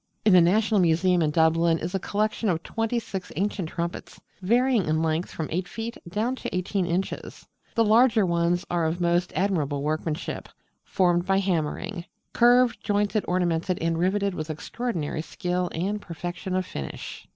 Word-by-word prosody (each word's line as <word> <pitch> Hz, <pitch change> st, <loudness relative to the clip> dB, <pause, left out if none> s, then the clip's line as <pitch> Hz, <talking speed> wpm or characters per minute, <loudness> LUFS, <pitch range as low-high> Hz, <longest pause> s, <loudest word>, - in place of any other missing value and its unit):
In 210 Hz, -, +6 dB
the 180 Hz, -, +8 dB
National 210 Hz, +5 st, +3 dB
Museum 175 Hz, +1 st, +3 dB
in 155 Hz, -, +2 dB
Dublin 165 Hz, +1 st, +3 dB
is 170 Hz, +3 st, -4 dB
a 195 Hz, -, 0 dB
collection 215 Hz, +3 st, -1 dB
of 170 Hz, -2 st, -1 dB
twenty 225 Hz, +1 st, -2 dB
six 195 Hz, -5 st, -5 dB
ancient 195 Hz, -3 st, -1 dB
trumpets, 170 Hz, +1 st, -5 dB, 0.2 s
varying 240 Hz, +1 st, +3 dB
in 155 Hz, +1 st, +1 dB
length 160 Hz, +2 st, 0 dB
from 160 Hz, -, -4 dB
8 180 Hz, +3 st, -1 dB
feet 225 Hz, +4 st, -5 dB
down 220 Hz, +8 st, -1 dB
to -, -, -5 dB
18 185 Hz, 0 st, -1 dB
inches. 180 Hz, +3 st, -3 dB, 0.3 s
The 230 Hz, -, +4 dB
larger 220 Hz, -1 st, +5 dB
ones 170 Hz, 0 st, +1 dB
are 170 Hz, -2 st, +1 dB
of 165 Hz, +3 st, -2 dB
most 175 Hz, +1 st, +1 dB
admirable 155 Hz, -8 st, 0 dB
workmanship, 155 Hz, +2 st, -3 dB, 0.3 s
formed 175 Hz, -1 st, +1 dB
by 195 Hz, 0 st, +3 dB
hammering; 175 Hz, 0 st, -1 dB, 0.3 s
curved, 245 Hz, -2 st, +4 dB
jointed, 205 Hz, +1 st, 0 dB
ornamented, 180 Hz, 0 st, 0 dB
and 165 Hz, 0 st, 0 dB
riveted 195 Hz, +3 st, +1 dB
with 155 Hz, -2 st, -5 dB
extraordinary 160 Hz, -1 st, -3 dB
skill 180 Hz, +1 st, -2 dB
and 200 Hz, +5 st, -2 dB
perfection 175 Hz, +2 st, -5 dB
of 185 Hz, 0 st, 0 dB
finish. 70 Hz, -, -7 dB
180 Hz, 160 wpm, -26 LUFS, 165-205 Hz, 0.3 s, the